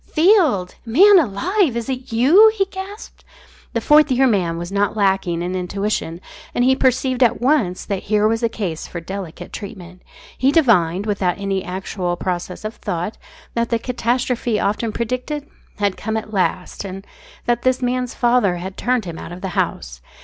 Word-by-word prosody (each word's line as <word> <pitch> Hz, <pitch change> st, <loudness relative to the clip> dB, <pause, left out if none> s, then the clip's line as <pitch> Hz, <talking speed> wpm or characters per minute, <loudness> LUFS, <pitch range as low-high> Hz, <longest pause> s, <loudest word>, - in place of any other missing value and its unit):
"Field! 310 Hz, -, +3 dB
Man 370 Hz, -, +6 dB
alive! 315 Hz, -, +1 dB
Is 235 Hz, -, -4 dB
it 255 Hz, -2 st, -5 dB
you?" 320 Hz, -, +6 dB
he 395 Hz, -2 st, +2 dB
gasped. 390 Hz, +2 st, -9 dB, 0.5 s
The 230 Hz, -, 0 dB
Fourth 300 Hz, +3 st, +5 dB
Year 260 Hz, +1 st, +4 dB
Man 180 Hz, -9 st, +1 dB
was 175 Hz, +2 st, -6 dB
not 200 Hz, +1 st, 0 dB
lacking 190 Hz, -4 st, +1 dB
in 180 Hz, +1 st, -3 dB
intuition, 185 Hz, -2 st, -2 dB, 0.3 s
and 245 Hz, -, +2 dB
he 260 Hz, +1 st, +4 dB
perceived 260 Hz, 0 st, +1 dB
at 240 Hz, -1 st, +4 dB
once 245 Hz, -9 st, +1 dB
that 200 Hz, -3 st, -2 dB
here 210 Hz, 0 st, +3 dB
was 225 Hz, +1 st, 0 dB
a 230 Hz, -, +1 dB
case 185 Hz, -8 st, -4 dB
for 175 Hz, -, -6 dB
delicate 175 Hz, -1 st, -7 dB
treatment. 185 Hz, -3 st, -9 dB, 0.3 s
He 265 Hz, +2 st, +2 dB
divined, 205 Hz, -, +3 dB
without 195 Hz, -4 st, 0 dB
any 195 Hz, -1 st, -2 dB
actual 180 Hz, -1 st, -3 dB
process 180 Hz, +2 st, -4 dB
of 215 Hz, -, -5 dB
thought, 175 Hz, +5 st, -4 dB, 0.3 s
that 235 Hz, 0 st, -1 dB
the 230 Hz, -, +2 dB
catastrophe 240 Hz, -1 st, -1 dB
often 215 Hz, +2 st, -1 dB
predicted 255 Hz, +6 st, -3 dB, 0.3 s
had 200 Hz, -2 st, 0 dB
come 220 Hz, +1 st, -2 dB
at 220 Hz, 0 st, -6 dB
last, 185 Hz, -1 st, -1 dB
and 195 Hz, 0 st, -7 dB, 0.4 s
that 240 Hz, 0 st, +1 dB
this 255 Hz, 0 st, +2 dB
man's 250 Hz, 0 st, -1 dB
father 240 Hz, -7 st, +2 dB
had 185 Hz, +2 st, -7 dB
turned 245 Hz, -3 st, 0 dB
him 170 Hz, -2 st, -6 dB
out -, -, -8 dB
of 175 Hz, +1 st, -8 dB
the 190 Hz, -, -3 dB
house. -, -, -3 dB
215 Hz, 175 wpm, -20 LUFS, 185-255 Hz, 0.5 s, Man